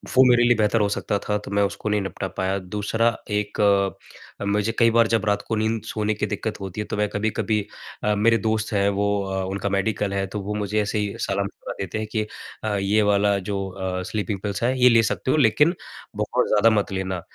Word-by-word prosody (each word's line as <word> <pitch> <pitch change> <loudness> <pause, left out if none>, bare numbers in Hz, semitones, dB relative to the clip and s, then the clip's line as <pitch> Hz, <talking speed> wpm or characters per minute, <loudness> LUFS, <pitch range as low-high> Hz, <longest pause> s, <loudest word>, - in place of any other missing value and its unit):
वो 130 - +8
मेरे 120 -1 +5
लिए 120 0 +5
बेहतर 110 +1 +2
हो 105 - +3
सकता 100 0 -1
था 105 +1 -1
तो - - -8
मैं 100 0 +2
उसको 100 +2 -2
नहीं 105 0 +1
निपटा 95 -2 -4
पाया। 95 +1 0
दूसरा 105 +4 -1 0.2
एक, 105 0 -2 0.9
मुझे 105 +2 +1
कई 115 -1 +5
बार 115 0 +4
जब 115 0 +1
रात 105 -1 +1
को 110 - 0
नींद 110 +1 0
सोने 105 0 -1
की 105 - -2
दिक्कत 105 +1 -4
होती 95 +2 -5
है - - -4
तो - - -1
मैं 105 0 +2
कभी-कभी 110 +1 0 0.4
अ, 105 - +2
मेरे 115 +3 +4
दोस्त 110 +1 -1
हैं 100 -1 +2
वो 100 +1 0 0.2
अ, 95 0 -2
उनका 100 +1 -2
मेडिकल 100 +1 0
है, 100 0 0
तो 105 +2 -5
वो 100 +2 -4
मुझे 105 0 0
ऐसे 105 +1 -2
ही 105 -1 -2
सलाह-मशफ़रा 100 0 -3
देते 95 +2 -3
हैं 110 - -3
कि 110 -2 0 0.4
अ, 110 -1 -1
ये 100 +2 +2
वाला 100 0 +3
जो 100 - -1
अ, 95 -1 -4
स्लीपिंग 105 -2 -2
पिल्स 100 0 -3
है 125 +2 +2
ये 125 - +8
ले 115 -1 +5
सकते 130 - -1
हो - - +2
लेकिन, 150 - +4 0.4
बहुत - - 0
ज़्यादा 105 +2 +4
मत 100 - -3
लेना, 95 -1 -3
105 Hz, 225 wpm, -23 LUFS, 100-110 Hz, 0.9 s, वो